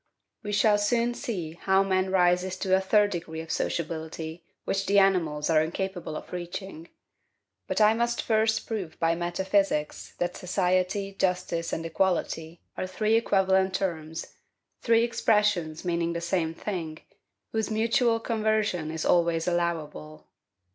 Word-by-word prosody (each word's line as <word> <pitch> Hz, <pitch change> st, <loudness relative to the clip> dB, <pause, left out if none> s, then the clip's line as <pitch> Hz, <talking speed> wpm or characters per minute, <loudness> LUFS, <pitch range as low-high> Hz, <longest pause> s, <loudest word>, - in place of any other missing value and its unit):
We 205 Hz, -, -5 dB
shall 205 Hz, +1 st, +4 dB
soon 235 Hz, +3 st, +1 dB
see 185 Hz, -10 st, -4 dB
how 190 Hz, +3 st, +2 dB
man 190 Hz, -1 st, +1 dB
rises 180 Hz, 0 st, +2 dB
to 190 Hz, 0 st, +2 dB
a 190 Hz, -, +2 dB
third 205 Hz, +1 st, +3 dB
degree 165 Hz, -2 st, -5 dB
of 160 Hz, 0 st, -6 dB
sociability 160 Hz, 0 st, -3 dB, 0.2 s
which 195 Hz, 0 st, -1 dB
the 200 Hz, -, +3 dB
animals 170 Hz, -7 st, +3 dB
are 160 Hz, -2 st, +4 dB
incapable 175 Hz, 0 st, -3 dB
of -, -, -8 dB
reaching. 175 Hz, -1 st, -6 dB, 0.8 s
But -, -, -1 dB
I 215 Hz, +1 st, +6 dB
must 235 Hz, +1 st, 0 dB
first 220 Hz, 0 st, +1 dB
prove 195 Hz, -8 st, -5 dB
by 165 Hz, 0 st, +2 dB
metaphysics 175 Hz, -1 st, -1 dB
that 175 Hz, 0 st, -2 dB
SOCIETY, 185 Hz, +2 st, 0 dB
JUSTICE, 180 Hz, -3 st, 0 dB
and 165 Hz, -, -3 dB
EQUALITY, 165 Hz, -1 st, -1 dB
are 185 Hz, -, -2 dB
three 215 Hz, +4 st, 0 dB
equivalent 190 Hz, -4 st, +2 dB
terms, 160 Hz, -4 st, -3 dB, 0.6 s
three 230 Hz, -1 st, +4 dB
expressions 210 Hz, -8 st, +1 dB
meaning 170 Hz, -1 st, 0 dB
the 170 Hz, -, -2 dB
same 170 Hz, -1 st, -1 dB
thing, 165 Hz, -5 st, -5 dB, 0.5 s
whose 220 Hz, -1 st, -1 dB
mutual 230 Hz, +2 st, +2 dB
conversion 215 Hz, -7 st, 0 dB
is 160 Hz, 0 st, -4 dB
always 170 Hz, -1 st, +2 dB
allowable. 150 Hz, -, -3 dB
185 Hz, 140 wpm, -27 LUFS, 165-205 Hz, 0.8 s, I